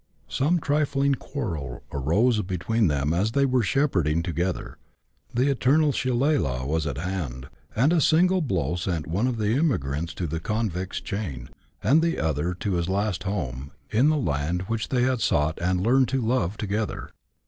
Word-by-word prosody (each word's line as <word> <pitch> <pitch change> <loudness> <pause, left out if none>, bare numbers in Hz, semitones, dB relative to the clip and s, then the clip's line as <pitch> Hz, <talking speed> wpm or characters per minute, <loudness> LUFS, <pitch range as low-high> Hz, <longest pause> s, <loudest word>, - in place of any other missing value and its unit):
Some 160 +6 +1
trifling 140 -2 +1
quarrel 80 - -5
arose 105 - +2
between 100 +4 0
them 75 0 0
as 100 +6 0
they 140 0 +3
were 130 -2 +2
shepherding 90 - +1
together, 85 +1 -3 0.5
the 125 +3 +1
eternal 145 +3 +3
shilelagh 125 - 0
was 80 +2 -1
at 70 - -3
hand, 75 -7 -4 0.3
and 135 +9 +3
a 170 - +3
single 180 +5 +4
blow 90 - -1
sent 85 -2 -2
one 95 +10 0
of 125 -2 -1
the 110 0 +1
emigrants 85 - 0
to 90 - -3
the 80 +1 -3
convict's 95 -2 -2
chain, 90 - -5 0.3
and 155 +5 +5
the 170 0 0
other 80 +3 -1
to 100 +2 -2
his 85 0 -1
last 100 -1 -1
home, 70 -9 -4 0.2
in 125 +7 +4
the 155 - +2
land 85 - -1
which 110 +3 -3
they 125 -2 +2
had 130 -2 +1
sought 75 +2 +1
and 90 +1 +1
learned 130 +2 +4
to 135 - 0
love 110 -5 0
together. 105 +1 -3
100 Hz, 170 wpm, -25 LUFS, 80-130 Hz, 0.5 s, and